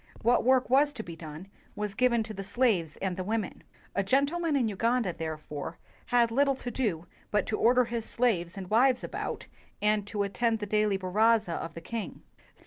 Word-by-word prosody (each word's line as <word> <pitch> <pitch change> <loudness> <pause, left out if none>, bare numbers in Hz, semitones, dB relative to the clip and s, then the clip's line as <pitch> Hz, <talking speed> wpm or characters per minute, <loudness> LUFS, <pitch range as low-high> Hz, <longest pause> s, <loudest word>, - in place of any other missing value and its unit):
What 240 +2 +4
work 260 +1 +4
was 285 +3 +4
to 230 -6 -6
be 170 -3 -8
done 160 +2 -9 0.3
was 210 -1 -3
given 235 0 +2
to 215 0 -7
the 195 -1 -6
slaves 200 -7 +1
and 190 -2 -1
the 185 - -3
women. 215 0 -2 0.3
A 200 - +1
"gentleman" 285 - +1
in 250 -5 +2
Uganda, 230 -1 0
therefore, 155 -1 -5 0.3
had 240 -2 +3
lit 275 +5 +4
tle 275 -1 +1
to 245 -1 -6
do 205 -10 -1 0.2
but 210 - +1
to 215 - -1
order 250 +2 +5
his 235 -1 -3
slaves 200 -7 0
and 190 -1 -6
wives 250 +3 +4
about, - - -4 0.3
and 210 -1 +1
to 205 -1 -1
attend 225 +3 0
the 210 - -4
daily 210 -1 +1
baraza 210 +1 +2
of 165 0 -5
the 165 - -7
king. 225 +5 -6
215 Hz, 195 wpm, -29 LUFS, 190-245 Hz, 0.3 s, order